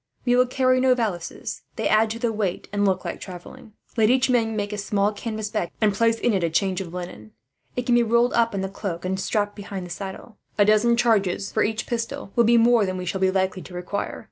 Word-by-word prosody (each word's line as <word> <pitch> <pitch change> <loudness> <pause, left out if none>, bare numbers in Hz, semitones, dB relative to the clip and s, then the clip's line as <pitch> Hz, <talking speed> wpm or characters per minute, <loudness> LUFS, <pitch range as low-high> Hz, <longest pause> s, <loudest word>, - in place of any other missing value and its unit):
"We 245 -1 +3
will 250 0 +4
carry 255 0 +2
no 255 -1 +4
valises. 190 -8 -4
They - - -1
add 215 +1 +3
to 225 - -4
the 235 -1 -1
weight, 200 -4 -2
and 205 0 +1
look 190 - 0
like - - -5
travelling. 205 +6 -10 0.2
Let 220 -2 +3
each 255 +1 +3
man 225 -3 +1
make 205 0 -2
a - - -3
small 200 +1 0
canvas 215 0 -5
bag, 195 -6 -1
and 215 -2 +3
place 230 +2 +2
in 235 0 +1
it 190 -3 0
a 170 - +1
change 185 +3 0
of 175 -3 -7
linen. 170 -13 -8 0.4
It 250 - -2
can 245 - +2
be 240 - +5
rolled 235 +1 +2
up 230 -2 +2
in 195 - -1
the 190 - -2
cloak, 185 -3 -5
and 190 +1 -1
strapped 205 +1 -1
behind 195 -2 -6
the 175 - -10
saddle. 195 +4 -7 0.2
A 205 - +5
dozen 215 +3 +4
charges, 200 -5 +1
for - - 0
each 215 +1 -1
pistol, 235 0 -4
will 235 - +4
be 235 +1 +5
more 235 -1 +5
than 185 -1 -2
we 180 - -5
shall 190 +2 -3
be 190 - +4
likely 190 0 0
to 180 - -11
require. 180 +3 -4
210 Hz, 245 wpm, -24 LUFS, 190-235 Hz, 0.4 s, be